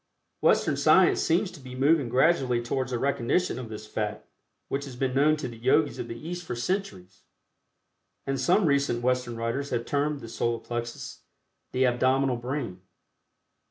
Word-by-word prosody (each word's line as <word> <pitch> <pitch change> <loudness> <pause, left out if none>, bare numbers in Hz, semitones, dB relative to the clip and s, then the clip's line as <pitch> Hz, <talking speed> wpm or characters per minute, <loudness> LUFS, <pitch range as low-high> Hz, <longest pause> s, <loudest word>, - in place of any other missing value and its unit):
Western - - +3
science - - +4
seems 180 +4 +1
to 175 - -12
be 130 -2 -10
moving 140 0 +3
gradually 130 -1 +3
towards 130 +2 -2
a 125 - 0
recognition 140 +6 0
of 120 -3 -7
this 110 0 -7
fact 105 0 -4 0.4
which 140 +1 -3
has 135 -3 -9
been 130 0 -1
known 150 +3 +4
to 150 - -4
the 120 -2 -9
Yogis 140 +5 +2
of - - -4
the 115 - -6
East 175 +1 -5
for 125 - -5
centuries, 105 - -4 1.0
and 135 -1 -1
some 180 +8 +3
recent 140 -5 +1
Western 125 -1 0
writers 115 +5 -2
have 120 -1 -2
termed 145 0 0
the 115 - -8
Solar 115 +1 -1
Plexus 120 0 -6 0.5
the 130 +1 +2
"Abdominal 130 +1 +2
Brain." 120 -7 -4
130 Hz, 165 wpm, -27 LUFS, 120-140 Hz, 1.0 s, science